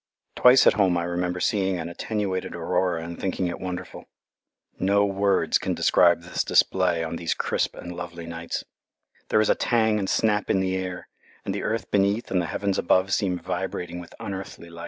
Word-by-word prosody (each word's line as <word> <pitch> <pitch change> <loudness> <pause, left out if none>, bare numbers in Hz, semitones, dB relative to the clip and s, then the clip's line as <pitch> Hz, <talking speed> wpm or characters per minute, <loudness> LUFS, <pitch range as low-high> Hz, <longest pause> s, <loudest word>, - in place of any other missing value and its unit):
Twice 125 +1 +6
at - - +7
home 95 -4 +2
I 85 - -1
remember 90 +1 -2
seeing 95 -1 +1
an 85 -1 -4
attenuated 95 +1 -3
aurora 90 0 0
and 85 +1 -7
thinking 95 -1 -1
it 85 - -3
wonderful. 90 -1 -6 0.7
No 100 +2 +3
words 100 -1 +1
can - - -2
describe 85 -1 +4
this 90 0 -2
display 90 -3 +2
on 80 +1 -4
these 85 -1 -1
crisp - - -1
and 90 - -8
lovely 85 -1 -7
nights. 85 0 -5 0.7
There 110 - +4
is 110 - +1
a - - +6
tang 110 -3 +1
and 95 -1 -2
snap 105 -2 +1
in 95 - +3
the 95 0 0
air, 90 -1 -5 0.4
and - - -2
the - - -3
earth 115 +1 -3
beneath 100 +3 +1
and 90 -1 +2
the 85 - -3
heavens 100 +4 -1
above 95 +2 +2
seem 90 -3 +1
vibrating 90 0 -4
with 85 - -11
unearthly 95 -3 -7
life. 85 - -11
95 Hz, 190 wpm, -25 LUFS, 85-100 Hz, 0.7 s, at